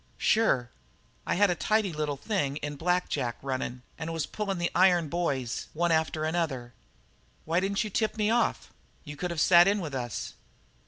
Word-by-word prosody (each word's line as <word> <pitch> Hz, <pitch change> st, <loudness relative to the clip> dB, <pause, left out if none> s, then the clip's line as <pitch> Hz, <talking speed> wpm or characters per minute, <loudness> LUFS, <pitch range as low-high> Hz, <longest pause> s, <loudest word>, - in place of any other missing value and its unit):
"Sure. 135 Hz, -, +2 dB, 0.6 s
I -, -, +1 dB
had 200 Hz, +1 st, +4 dB
a -, -, 0 dB
tidy 215 Hz, 0 st, +1 dB
little 150 Hz, -2 st, -2 dB
thing 145 Hz, -6 st, -1 dB
in 145 Hz, 0 st, -4 dB
black 180 Hz, +4 st, 0 dB
jack 125 Hz, -5 st, -2 dB
running 130 Hz, -2 st, -3 dB, 0.2 s
and 160 Hz, 0 st, -4 dB
was 165 Hz, -2 st, -2 dB
pulling 210 Hz, -2 st, -3 dB
in -, -, -5 dB
the 175 Hz, 0 st, -1 dB
iron 175 Hz, -3 st, +4 dB
boys, 140 Hz, -8 st, -2 dB
one 170 Hz, +2 st, +1 dB
after 160 Hz, -1 st, +1 dB
another. 155 Hz, -7 st, -2 dB, 0.7 s
Why 165 Hz, +2 st, +2 dB
didn't 195 Hz, +3 st, 0 dB
you 215 Hz, -, -5 dB
tip 220 Hz, +2 st, 0 dB
me 210 Hz, 0 st, +2 dB
off? 140 Hz, -, 0 dB, 0.3 s
You 150 Hz, -, -8 dB
could 180 Hz, +4 st, -3 dB
have 170 Hz, -2 st, -3 dB
sat 175 Hz, +2 st, +7 dB
in 205 Hz, +1 st, +2 dB
with 160 Hz, -6 st, -5 dB
us." 120 Hz, -3 st, -4 dB
165 Hz, 190 wpm, -28 LUFS, 140-190 Hz, 0.7 s, sat